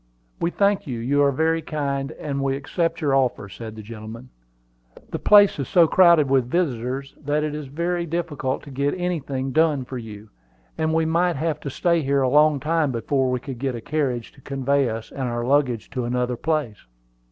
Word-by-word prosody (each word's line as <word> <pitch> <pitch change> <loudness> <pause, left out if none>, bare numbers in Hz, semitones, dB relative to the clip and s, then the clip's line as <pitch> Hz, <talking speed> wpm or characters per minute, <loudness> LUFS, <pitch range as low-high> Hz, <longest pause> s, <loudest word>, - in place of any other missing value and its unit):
"We 170 - +1
thank 200 0 +1
you; 125 -3 -3
you 135 +5 +1
are 140 -1 +4
very 160 +4 +1
kind, 140 -2 -3
and 140 -2 -4
we 135 0 0
accept 165 +5 -2
your 145 -3 +1
offer," 125 -6 0
said 110 +3 -9
the 110 - -9
gentleman. 115 +3 -9 0.8
"The - - -3
place 205 -5 +6
is 135 - -2
so 170 -2 +5
crowded 170 -3 +5
with 130 -2 +2
visitors 135 -4 -2
that 145 +1 0
it 155 -1 -2
is 150 -2 -5
very 170 +4 -2
difficult 155 -5 -2
to 145 - -11
get 140 +4 -1
anything 140 -7 -2
done 155 -3 +2
for 130 0 -6
you; 110 -2 -10 0.4
and 160 0 0
we 160 0 +2
might 170 +2 +1
have 155 +2 -1
to 140 - -5
stay 170 +4 +1
here 140 -1 +1
a 130 - +2
long 150 +1 +4
time 155 -1 +1
before 130 +2 0
we 125 0 0
could 130 -1 -8
get 135 -1 -2
a - - -5
carriage 130 -4 -2
to 135 - -20
convey 135 0 0
us 110 0 -6
and 130 -3 -3
our 120 0 -2
luggage 130 -4 +1
to 125 -3 -3
another 125 0 -1
place. 145 -6 -2
140 Hz, 200 wpm, -23 LUFS, 125-160 Hz, 0.8 s, place